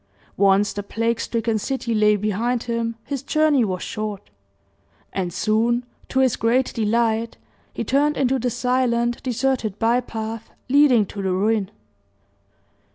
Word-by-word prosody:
Once 200 +1 +3
the 205 - -3
plague 230 +3 -1
stricken 225 -1 -1
city 250 0 -2
lay 210 -1 +4
behind 215 +4 -1
him, 230 -1 -2
his 280 -3 -4
journey 300 -2 +2
was 185 -4 -2
short; 210 - -5 0.8
and 185 -2 -2
soon, 230 +5 +1 0.2
to 265 - +2
his 260 -3 +2
great 245 +3 +1
delight, 225 0 0 0.3
he - - -4
turned 290 +2 +1
into 265 0 +1
the 250 +1 0
silent 240 -1 0
deserted 250 -4 -1
by 230 +3 +2
path 225 -2 -6 0.2
leading 265 -5 +5
to 200 +1 -7
the 190 -1 -1
ruin. 200 +1 +1
230 Hz, 140 wpm, -22 LUFS, 215-250 Hz, 0.8 s, leading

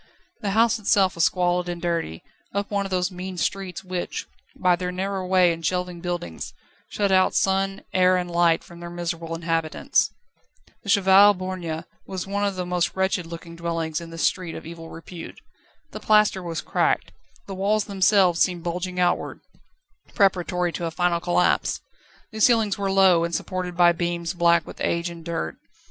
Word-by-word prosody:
The 205 - -1
house 230 0 +4
itself 195 -3 +3
was 170 - +2
squalid 180 -1 +1
and 175 0 -4
dirty, 165 - -2 0.3
up 200 +1 -2
one 200 -1 0
of - - -12
those 185 0 0
mean 185 0 -6
streets 195 +1 -3
which, 180 -1 -4 0.3
by 180 -1 +3
their 180 +1 -3
narrow 190 +1 -3
way 180 -2 +4
and 165 0 -9
shelving 180 +1 -2
buildings, 175 - -5 0.3
shut 200 -2 0
out 185 0 +3
sun, 195 0 +1
air, 185 0 +4
and 180 -1 -3
light 170 -1 +3
from 170 0 -13
their 170 0 -7
miserable 170 -1 -4
inhabitants. 165 -1 0 0.7
The 200 - -9
Cheval 200 0 +6
Borgne 180 -3 -4 0.2
was 185 -2 -4
one 200 +1 -2
of 200 -1 0
the 180 -1 -3
most 180 -1 -1
wretched 190 -2 0
looking 170 0 -9
dwellings 165 -1 -3
in 170 - -9
this 165 0 -4
street 175 -3 0
of - - -8
evil 165 0 -9
repute. 165 +1 -10 0.5
The - - -7
plaster 210 -3 +3
was 165 -3 -4
cracked, - - 0 0.3
the 195 - -7
walls 200 +2 +1
themselves 190 -3 +3
seemed 175 -3 +1
bulging 180 +1 -3
outward, 175 -1 0 0.7
preparatory 180 -3 +2
to 170 - -4
a - - -1
final 175 +1 0
collapse. 175 +1 +1 0.5
The 220 -1 -6
ceilings 225 -3 +4
were 200 -1 -2
low, 190 -3 +5
and 170 0 -2
supported 180 -2 -4
by 175 -1 +6
beams 170 0 -2
black 170 -2 +3
with - - -11
age 170 +1 -1
and 170 -1 -10
dirt. 160 - -4
180 Hz, 175 wpm, -24 LUFS, 170-190 Hz, 0.7 s, Cheval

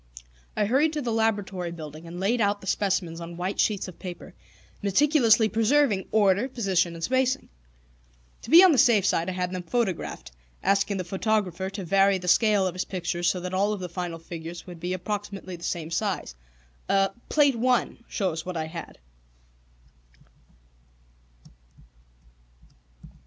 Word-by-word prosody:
I 210 - +2
hurried 280 +8 +2
to 300 - -2
the 240 - -2
laboratory 205 -5 -1
building, 155 -1 -9
and 175 +1 -8
laid 225 +5 +1
out 205 0 +1
the 195 - -13
specimens 185 -4 -1
on 170 0 -8
white 185 +3 -3
sheets 205 -3 +1
of 185 - -11
paper, 180 -2 -8 0.5
meticulously 230 - +4
preserving 225 -1 +2
order, 205 +3 +3
position, 190 -8 0
and 165 - -8
spacing. 260 +4 0 0.9
To - - -10
be 335 +4 +9
on 375 - +7
the 275 - +3
safe 230 -8 +5
side 170 -2 +1
I - - -3
had 180 0 -2
them 185 -1 -4
photographed, 190 - -3 0.3
asking 195 +1 +1
the 185 - -2
photographer 190 -1 -1
to 195 0 -6
vary 195 +2 +3
the 180 -1 -8
scale 210 0 +4
of 185 - -1
his 185 - -2
pictures 175 -1 -1
so 185 - -1
that 180 +1 -5
all 200 +3 +1
of 205 - -5
the 180 -1 -5
final 175 -1 -4
figures 165 +1 -8
would 175 -2 -10
be 175 +2 -3
approximately 195 0 -5
the 170 - -13
same 165 -3 -3
size. 190 - -2 1.0
Plate 290 -4 +4
I. 250 -1 +1
shows 165 -6 -2
what 180 -2 -5
I 160 - -2
had. 165 +1 -8
190 Hz, 155 wpm, -26 LUFS, 175-220 Hz, 1.0 s, be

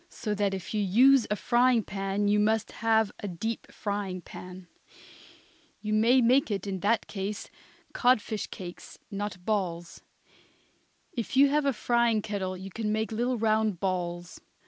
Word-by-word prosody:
So 210 - -4
that 200 -1 0
if 190 - -7
you 210 - +1
use 245 +6 +5
a 210 - +1
frying 240 +1 +3
pan 195 +1 -2
you 210 +1 +3
must 220 +1 +1
have 220 -1 +2
a 205 - -5
deep 215 +5 -4
frying 200 -3 -3
pan. 180 +1 -10 1.1
You 215 0 -3
may 235 +4 +5
make 250 +2 +4
in 195 -2 -3
that 215 +4 +1
case 200 +1 -5 0.4
codfish 225 -4 +1
cakes, 175 -2 -9
not 200 -3 -5
balls. 175 -5 -2 1.1
If 240 +1 -3
you 280 +1 +7
have 295 +1 +1
a - - +4
frying 235 -1 +1
kettle 190 -3 -3
you 190 +1 -8
can 215 +1 -2
make 220 +1 -1
little 240 +3 0
round 215 -4 +1
balls. 175 -2 -3
210 Hz, 150 wpm, -28 LUFS, 195-230 Hz, 1.1 s, you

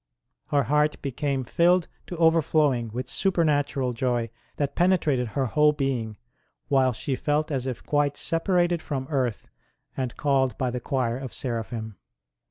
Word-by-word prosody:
Her 145 -1 +2
heart 150 +4 +1
became 135 0 -1
filled 175 +7 +3 0.2
to 175 - -6
overflowing 155 -7 +3
with 125 +3 -5
super 180 +2 +1
natural 145 -4 0
joy 120 -2 -1 0.2
that 140 -1 -1
penetrated 160 -9 +2
her 135 - +2
whole 150 +5 +3
being, 125 -7 -2 0.5
while 130 -2 +4
she 130 +3 -3
felt 150 +3 0
as 135 -2 -2
if 125 -3 -5
quite 145 -1 +1
separated 175 0 +1
from 135 -4 -3
earth 130 -6 -1 0.4
and 130 -3 -3
called 135 -3 +1
by 130 -2 -1
the 125 - -3
Choir 125 -1 -1
of 130 -2 -6
Seraphim. 115 -3 -4
135 Hz, 150 wpm, -26 LUFS, 125-150 Hz, 0.5 s, while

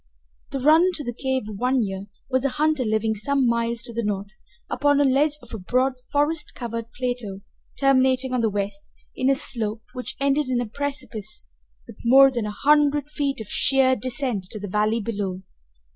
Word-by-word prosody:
The 275 - -3
runner 310 +7 +5
to 305 - -4
the 240 -2 -4
cave 265 +1 -1
of 210 -2 -7
One 255 0 +2
Ear 195 -1 -5 0.2
was 260 -1 +1
a 275 - +2
hunter 305 0 +1
living 220 0 +1
some 265 +6 0
miles 235 0 0
to 235 -1 -5
the 235 - -1
north, 200 -1 -2 0.4
upon 285 0 +2
a - - +5
ledge 285 +3 +2
of - - -12
a 220 - -5
broad 255 +8 +1 0.2
forest 295 +2 0
covered 230 -1 -5
plateau 245 -6 -3 0.4
terminating 260 -1 +3
on 250 - +1
the 225 - +2
west 200 0 -4 0.3
in 255 - +1
a 275 - +4
slope 220 -4 -3
which 250 -1 -5
ended 280 +1 +1
in 250 -1 +1
a 245 - -1
precipice 230 - -5 0.4
with - - -13
more 270 +3 +7
than 235 -4 -2
a - - -3
hundred 295 +4 +2
feet 280 -3 -1
of 215 - -8
sheer 260 +2 +3
descent 245 -4 -2
to 225 - -3
the 205 - -5
valley 215 +3 +1
below. 200 -4 -3
250 Hz, 190 wpm, -24 LUFS, 215-275 Hz, 0.4 s, more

